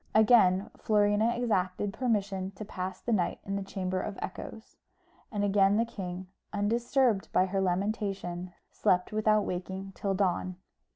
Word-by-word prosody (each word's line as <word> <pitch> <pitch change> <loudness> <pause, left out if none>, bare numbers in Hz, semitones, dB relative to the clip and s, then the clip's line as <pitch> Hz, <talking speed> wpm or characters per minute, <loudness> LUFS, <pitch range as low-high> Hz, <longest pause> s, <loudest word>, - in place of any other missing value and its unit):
Again 210 -4 +5
Florina 210 +2 +2
exacted 200 -4 0
permission 200 -6 -1
to 215 - -7
pass 185 -2 -5
the 235 - -1
night 185 -5 +1
in 195 - -2
the 200 - -1
Chamber 185 -1 -2
of 205 - -5
Echoes; 220 +3 -7 0.6
and 205 -3 -1
again 200 0 +4
the 230 - +3
king, 185 -5 -6 0.3
undisturbed 230 +1 +1
by 185 - +4
her 195 +1 -1
lamentation, 190 -1 -2 0.2
slept 180 0 +1
without 215 -1 +2
waking 190 +2 -4
till 195 0 -2
dawn. 185 -1 0
195 Hz, 140 wpm, -30 LUFS, 185-215 Hz, 0.6 s, Again